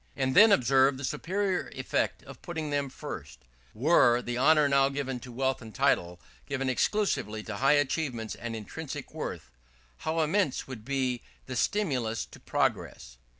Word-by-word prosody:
And 130 0 0
then 215 +2 +8
observe 135 -2 +4
the 135 - -7
superior 185 +8 -1
effect - - -1
of - - -12
putting 160 -4 -4
them 140 -1 0
first: 80 - -8 0.4
"Were 120 -2 +4
the 120 0 -4
honour 150 +3 +5
now 140 -1 +4
given 135 -2 -3
to 125 +1 -10
wealth 130 +2 -1
and 110 -4 -11
title 85 0 +1 0.3
given 135 -2 -1
exclusively 125 - 0
to 110 -2 -6
high 135 +5 +4
achievements 135 -6 -1
and 120 -1 -6
intrinsic 110 -2 -7
worth, - - -6 0.5
how 160 - -1
immense 155 -2 0
would 125 -5 -8
be 130 -1 -1 0.2
the 130 - -6
stimulus 125 - 0
to - - -15
progress!" - - -2
135 Hz, 155 wpm, -29 LUFS, 120-150 Hz, 0.5 s, then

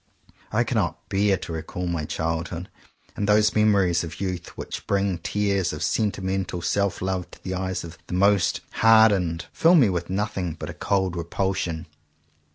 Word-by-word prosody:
I - - +2
cannot - - -2
bear 100 0 +2
to 85 - -7
recall 80 +3 -4
my 85 -3 -2
childhood; 80 +2 -3 0.5
and 105 0 -2
those 105 0 +4
memories 100 -5 +3
of 85 0 -7
youth 90 -3 -3
which - - -6
bring 100 -3 +1
tears 100 0 0
of 75 0 -4
sentimental 95 -4 -1
self 100 -2 0
love 95 -2 -2
to - - -16
the 95 - -3
eyes 95 0 -2
of 85 -1 -10
the - - -3
most 100 0 +3
hardened, 105 -7 +4
fill 170 +2 +5
me 130 - +6
with 85 -2 -2
nothing 95 -3 -2
but 80 0 -6
a - - -10
cold 95 +3 0
repulsion. 85 -1 -2
95 Hz, 165 wpm, -24 LUFS, 85-100 Hz, 0.5 s, me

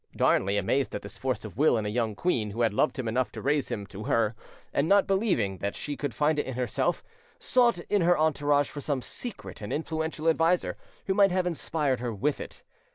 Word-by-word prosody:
Darnley, 100 +2 +2
amazed 130 +8 0
at - - -5
this - - -8
force 130 -3 -2
of 110 - -9
will 145 -3 +4
in 110 - -2
a - - -1
young 110 -1 -1
queen 115 - 0
who 110 +4 -4
had 115 -3 +2
loved 150 +7 +1
him 130 -3 -3
enough 125 +3 0
to - - -6
raise 145 +1 0
him 100 -2 -3
to 100 +2 -9
her, 115 -1 +2 0.4
and 145 +3 +1
not 200 0 +5
believing 185 - +1
that 100 0 -3
she 145 - -4
could 145 -2 -3
find 150 +3 +2
it - - -2
in 130 - -4
herself, 125 +8 -1 0.3
sought 245 -5 +3
in 205 +2 0
her 175 +1 +4
entourage 145 -2 +2
for 145 - -6
some 140 -3 -2
secret 235 - -6
and 105 - -5
influential 160 0 -2
adviser 165 +2 +2 0.3
who 190 - +1
might 195 -1 +5
have 185 0 +1
inspired 150 -5 -1
her 120 -1 -3
with 135 +8 -1
it. - - -10
145 Hz, 225 wpm, -28 LUFS, 115-165 Hz, 0.4 s, not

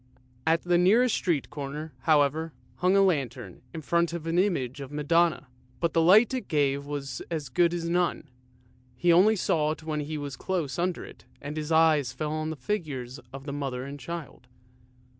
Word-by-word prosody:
At 165 +1 +3
the 175 -1 +3
nearest 225 +7 +4
street 165 -6 -1
corner, 150 +2 -6
however, 155 +1 +2 0.2
hung 180 +2 +2
a 195 - +6
lantern 130 - -1
in 160 - -7
front 170 +2 +1
of 170 -2 -5
an 165 +2 +1
image 145 -9 0
of 135 - -7
the 145 - -9
Madonna, 165 +2 +2 0.3
but 170 -1 0
the 165 - +3
light 205 +9 +6
it 255 - -3
gave 140 -2 0
was 140 -2 -5
as 155 -5 -4
good 170 +7 +3
as 170 -1 -3
none, 175 -2 0 0.7
he 170 +7 +3
only 200 +6 +5
saw 155 -5 +1
it 155 +1 -4
when 155 -1 -2
he 150 +1 -4
was 145 -2 -5
close 175 -1 -3
under 180 0 -1
it - - -14
and 145 +2 -6
his 155 0 -4
eyes 155 -5 +4
fell 150 +3 -3
on 155 0 -2
the 160 - -4
figures 135 - -4
of 135 0 -8
the 140 - -4
Mother 135 -3 -3
and 140 +1 -7
Child. 155 -3 -8
155 Hz, 195 wpm, -27 LUFS, 140-170 Hz, 0.7 s, a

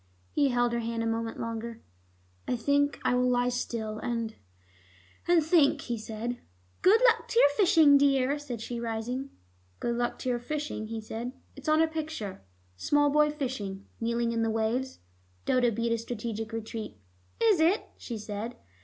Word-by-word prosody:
He 285 - +3
held 245 -1 +2
her 235 - 0
hand 230 0 -2
a - - -1
moment 225 0 -2
longer. 230 0 -5 0.6
"I - - +1
think 285 +4 +1
I - - +3
will 250 0 +3
lie 245 0 +2
still 225 -3 -3
and 230 -2 -2 0.9
and 340 -3 +4
think," 310 -3 +4
he 240 -3 -3
said. 225 +3 -4 0.4
"Good 410 +5 +6
luck 460 -2 +4
to 465 - +2
your 285 - +7
fishing, 300 -3 +6
dear," 275 0 +3
said 250 -6 -6
she, 235 +1 -4
rising. 235 +4 -3 0.5
"Good 235 - -1
luck 240 0 -1
to 255 - -3
your 240 -1 0
fishing?" 290 -3 -4
he 225 0 -4
said. 230 +3 -5 0.2
"It's 280 +2 -5
on 310 +1 +5
a - - +3
picture. 315 - -5 0.4
Small 290 - +3
boy 300 +1 +4
fishing, 245 -10 -4
kneeling 235 0 0
in 230 -1 0
the 225 - +1
waves." 225 +4 -1 0.5
Dodo 245 -1 +3
beat 230 +1 -1
a 230 - +1
strategic 225 -1 -4
retreat. 225 -1 -5 0.4
"Is 440 -6 +4
it?" 345 +7 +3
she 235 - -6
said. 215 +3 -5
240 Hz, 170 wpm, -29 LUFS, 225-285 Hz, 0.9 s, your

